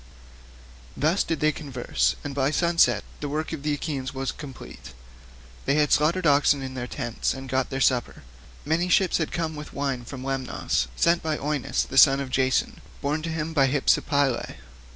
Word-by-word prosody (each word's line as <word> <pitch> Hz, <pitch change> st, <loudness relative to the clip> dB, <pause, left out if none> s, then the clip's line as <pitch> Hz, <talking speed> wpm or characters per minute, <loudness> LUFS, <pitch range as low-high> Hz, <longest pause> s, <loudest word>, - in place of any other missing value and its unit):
Thus 155 Hz, +8 st, +2 dB
did 165 Hz, -3 st, -3 dB
they 155 Hz, 0 st, +4 dB
converse, 135 Hz, -5 st, -1 dB
and 145 Hz, -, -5 dB
by 135 Hz, 0 st, +1 dB
sunset 170 Hz, +2 st, +3 dB, 0.2 s
the 145 Hz, -, -4 dB
work 155 Hz, +3 st, -3 dB
of 155 Hz, -, -5 dB
the 150 Hz, 0 st, 0 dB
Achaeans 140 Hz, -3 st, -4 dB
was 135 Hz, -1 st, -2 dB
completed; 135 Hz, -, -11 dB, 0.7 s
they 140 Hz, -, +2 dB
then 150 Hz, -1 st, +2 dB
slaughtered 170 Hz, +4 st, +2 dB
oxen 145 Hz, -1 st, +4 dB
at 130 Hz, 0 st, -6 dB
their 125 Hz, -1 st, -5 dB
tents 120 Hz, -3 st, -2 dB
and 135 Hz, 0 st, -8 dB
got 130 Hz, 0 st, 0 dB
their 135 Hz, -, -3 dB
supper. 125 Hz, -2 st, +1 dB, 0.4 s
Many 165 Hz, +4 st, 0 dB
ships 180 Hz, 0 st, +3 dB
had 160 Hz, -, -2 dB
come 160 Hz, -2 st, -2 dB
with 150 Hz, 0 st, -9 dB
wine 135 Hz, -3 st, -2 dB
from 130 Hz, +1 st, -8 dB
Lemnos, 135 Hz, -1 st, -1 dB
sent 170 Hz, 0 st, +3 dB
by 155 Hz, -1 st, -1 dB
Eueneus 145 Hz, -2 st, -1 dB
the 135 Hz, -, +2 dB
son 135 Hz, -1 st, +7 dB
of 135 Hz, -2 st, -5 dB
Jason, 130 Hz, 0 st, 0 dB, 0.2 s
born 150 Hz, +2 st, -1 dB
to 165 Hz, -, -4 dB
him 160 Hz, 0 st, -3 dB
by 135 Hz, -3 st, +4 dB
Hypsipyle. 140 Hz, -1 st, +1 dB
145 Hz, 180 wpm, -25 LUFS, 135-155 Hz, 0.7 s, son